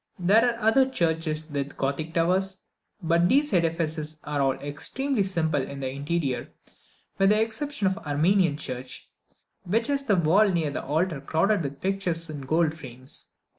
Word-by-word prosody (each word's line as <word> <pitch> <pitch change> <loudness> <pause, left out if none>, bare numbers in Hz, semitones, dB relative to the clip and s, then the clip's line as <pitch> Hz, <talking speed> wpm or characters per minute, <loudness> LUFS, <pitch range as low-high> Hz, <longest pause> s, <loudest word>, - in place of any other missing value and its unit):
There 200 +5 +4
are - - -11
other 235 +5 +4
churches 160 -7 -1
with 145 -2 -4
Gothic 150 +4 -2
towers, 190 +3 +1 0.5
but 170 +1 +3
these 290 -2 +3
edifices 160 -3 0
are 145 -1 -2
all 135 -1 +3
extremely 215 - -2
simple 165 -6 +1
in 140 +1 -6
the 130 -1 -3
interior, 140 -1 -2 0.7
with 195 0 +5
the 210 +1 +4
exception 225 +2 -2
of 190 - +3
the 190 -6 -10
Armenian 165 +1 +3
church, 130 -3 -6 0.6
which 220 +6 0
has 280 +1 0
the 215 -7 +2
wall 185 +5 +4
near 165 -5 0
the - - -4
altar 155 +1 -1
crowded 175 +8 +1
with 140 -2 -5
pictures 180 -4 -1
in 145 -2 -6
gold 155 +3 +1
frames. 130 -4 -8
165 Hz, 165 wpm, -26 LUFS, 145-195 Hz, 0.7 s, with